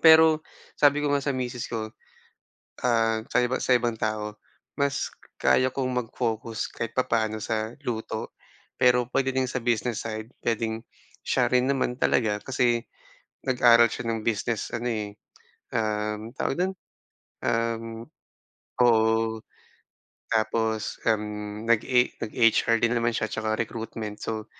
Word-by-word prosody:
Pero 160 -1 +7 0.3
sabi 145 0 +4
ko 150 - 0
nga 140 -1 +1
sa 140 - +1
misis 125 -2 -4
ko, 110 -2 -2 1.0
ah, 115 -2 +3
sa - - +2
iba 125 +1 0
sa 130 - +3
ibang 120 -2 +1
tao, 105 -1 -2 0.4
mas 140 0 0 0.3
kaya 130 0 +3
kong 130 -2 -1 0.2
mag-focus 115 -2 -3
kahit 115 0 -5
papaono 110 -4 0
sa 110 0 -2
luto, 110 -3 -4 0.4
pero 125 -1 +4
puwede 135 +1 0
din 130 0 0
sa 125 -1 -3
business 120 -1 0
side, 110 +2 -6
puwedeng 115 -1 -1 0.4
siya - - +2
rin 125 +1 +2
naman 130 -2 0
talaga 110 -4 +1
kasi, 120 -3 +1 0.6
nag-aral 120 -2 +6
siya 125 - -5
ng 115 -1 -1
business 115 0 -1
ano 120 +1 -3
eh, 105 -3 -3 0.6
um, 105 0 -1
tawag - - 0
dun? 185 +2 0 0.7
Um 115 0 -1 0.8
oo. 110 -1 +3 0.9
Tapos, 110 -1 0
um, 105 0 -2
nag 115 -2 +4
e 125 -1 +2
nag-HR 115 0 +3
din 115 +1 +2
naman 115 0 +2
siya 110 - -1
at - - -8
saka 110 0 -1
recruitment 110 -2 -4
so. 110 -1 -3
115 Hz, 135 wpm, -26 LUFS, 110-125 Hz, 1.0 s, Pero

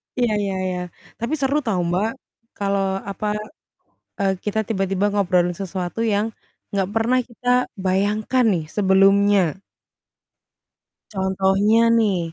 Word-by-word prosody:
Ya 240 -4 +1
ya 200 -2 -1 0.2
ya, 180 - -3 0.4
tapi 235 +6 -2
seru 280 +2 +1
tau, 215 -7 0
Mbak, 190 +6 0 0.5
kalau 195 -1 0
apa, 210 +2 -3 0.9
eee, 195 -2 +1
kita 215 +1 -1
tiba-tiba 195 -1 0
ngobrolin 180 -3 +2
sesuatu 185 +2 -5
yang, 220 0 0 0.4
nggak 195 -2 0
pernah 235 +3 +2
kita 250 +1 0 0.2
bayangkan 205 +6 +1
nih 165 -4 -1
sebelumnya. 195 -2 +4 1.5
Contohnya 195 +4 +2
nih, 205 -5 +2
200 Hz, 110 wpm, -22 LUFS, 190-225 Hz, 1.5 s, sebelumnya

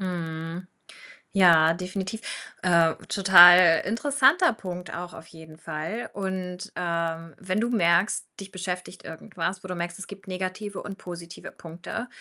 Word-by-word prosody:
Mhm. 170 -1 -5 0.7
Ja, 165 -4 +6
definitiv. 190 +4 -5 0.4
Äh, 170 -3 +3 0.2
total 175 -3 +7
interessanter 285 - +2
Punkt 180 -4 -8
auch 175 0 -7
auf 160 - -12
jeden 160 -1 -14
Fall. 165 +9 -6
Und, 185 -2 -5
ähm, 165 -2 -3
wenn 190 +2 -2
du 235 +2 0
merkst, 175 -2 +2
dich 195 -1 -10
beschäftigt 180 0 -6
irgendwas, 170 +3 -6
wo - - -8
du 180 - -4
merkst, 175 0 -5
es 195 - -8
gibt 195 -1 -12
negative 190 +2 -5
und 195 -1 -8
positive 170 -1 -9
Punkte, 175 +8 -8
180 Hz, 140 wpm, -25 LUFS, 170-195 Hz, 0.7 s, total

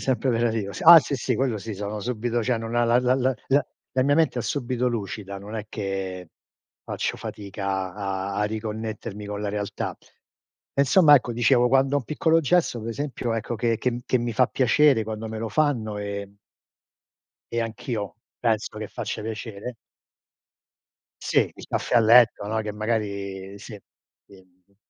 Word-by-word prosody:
Sempre 130 0 0
operativo 115 -4 0
s - - -7
ah 170 +1 +11
sì, 145 - -2
sì, 130 0 -1
quello 130 -3 0
sì, 110 +1 -6
sono 105 +2 -4
subito 120 +1 -1
cioè 120 +1 0
non 115 +1 -5
ha 120 0 +3
la 120 +1 +4
la 125 0 +2
la 130 0 +1
la 140 +2 +3 0.3
la 130 - +3
mia 145 +2 +3
mente 160 -5 +2
è - - -1
subito 125 -2 -1
lucida, 100 -3 -5
non 100 +3 -9
è 110 -1 -4
che 95 -4 -4 0.5
faccio - - -3
fatica 95 -2 -4
a 95 -1 -3
a 105 - +1
riconnettermi 110 -1 -5
con 105 0 -5
la 105 - -2
realtà. 100 -1 -4 0.8
E - - +2
insomma 145 +2 +6
ecco, 125 -3 +2
dicevo 120 +1 +3
quando 135 +2 +3
ho - - +4
un 125 - -7
piccolo 160 +4 +2
gesto 160 -5 +1
per 110 - -6
esempio 125 -2 -3
ecco 115 +1 -3
che 115 -1 +1
che 125 - 0
m 120 - -4
che 130 - +2
mi 120 -1 -2
fa 130 +1 +4
piacere 130 -1 +3
quando 110 0 -5
me 110 0 -5
lo 115 0 -3
fanno 115 -9 0
e 100 -1 -5 1.2
e 115 - 0
anch'io 110 -2 -4 0.2
penso 110 -2 -1
che 110 -1 -5
faccia - - -5
piacere. 110 +1 -6 1.5
Sì, - - +2 0.2
il - - -11
caffè - - -2
a 120 - +7
letto, 115 -1 +6
no, 110 0 0
che 105 -1 -4
magari, 100 -3 -3
sì. 105 0 -10 0.4
Quindi 95 0 -22
115 Hz, 180 wpm, -25 LUFS, 105-125 Hz, 1.5 s, ah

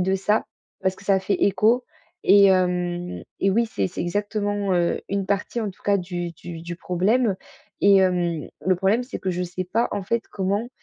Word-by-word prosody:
de 190 +1 +1
ça 210 +3 +1 0.3
parce 190 0 0
que 200 - -15
ça 195 -1 +3
fait 195 +1 0
écho 225 +5 +3 0.4
et 200 +1 +7
hem 180 -1 0 0.2
et 195 - +3
oui, 230 +4 +2
c'est 100 - -1
c'est - - -6
exactement, 205 +1 -1
heu, 175 -1 +1
une 200 -1 -1
partie, 200 +4 -1
en 215 - -2
tout 185 - -20
cas, 200 -1 +2
du 175 -1 -4
du 165 0 -9
du 170 0 -6
problème 195 +4 +1 0.5
et 200 -1 +7
hem, 175 -4 +1 0.2
le 185 -1 +3
problème, 195 +6 +2
c'est 250 - -6
que 190 - -4
je 180 0 -2
sais 180 +1 -4
pas, 230 +2 +1
en 205 -1 -3
fait, 230 +4 -1
comment, 200 +4 -1
190 Hz, 200 wpm, -23 LUFS, 180-205 Hz, 0.5 s, et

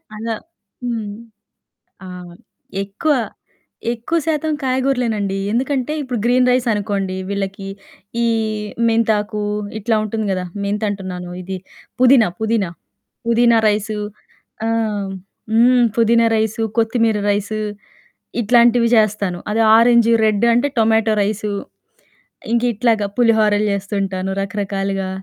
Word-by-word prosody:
అలా 225 +1 -3 0.5
హ్మ్. 225 -4 -3 0.9
ఆ! - - -8 0.7
ఎక్కువ 205 +10 0 0.8
ఎక్కువ 240 +8 -1
శాతం 315 -1 0
కాయగూరలేనండి. 250 -6 0 0.2
ఎందుకంటే 260 +3 -1
ఇప్పుడు 250 -3 -3
గ్రీన్ 250 +1 +3
రైస్ 250 0 +2
అనుకోండి 200 -2 -2
వీళ్ళకి 195 0 -4 0.5
ఈ - - +2 0.6
మెంతాకు 215 -2 +1 0.4
ఇట్లా 220 +1 0
ఉంటుంది 215 0 -3
గదా! 185 -1 -2 0.2
మెంతంటున్నాను 200 -3 -3
ఇది 190 +1 -5 0.4
పుదీనా, 255 -4 +6
పుదీనా, 220 -4 0 0.6
పుదీనా 235 0 +4
రైసు 210 +1 -1 0.7
ఆహ్, 215 -3 -1 0.4
హ్మ్. - - +2
హ్మ్. 245 +1 +5
పుదీనా 230 0 +4
రైసు, 220 +1 -1 0.2
కొత్తిమీర 225 -1 +2
రైసు 205 +1 -1 0.8
ఇట్లాంటివి 235 +1 +4
చేస్తాను. 205 -4 +1
అది 220 +2 +1 0.2
ఆరెంజూ 235 0 +5
రెడ్డు 215 +1 +2
అంటే 245 +5 +2
టొమాటో 220 0 +3
రైసు. 210 +1 -2 1.0
ఇంకా 235 +1 +2
ఇట్లాగా 220 -2 +1
పులిహోరలు 215 -3 +3
చేస్తుంటాను 195 -1 -2
రకరకాలుగా. 195 -1 -2
220 Hz, 105 wpm, -19 LUFS, 200-235 Hz, 1.0 s, పుదీనా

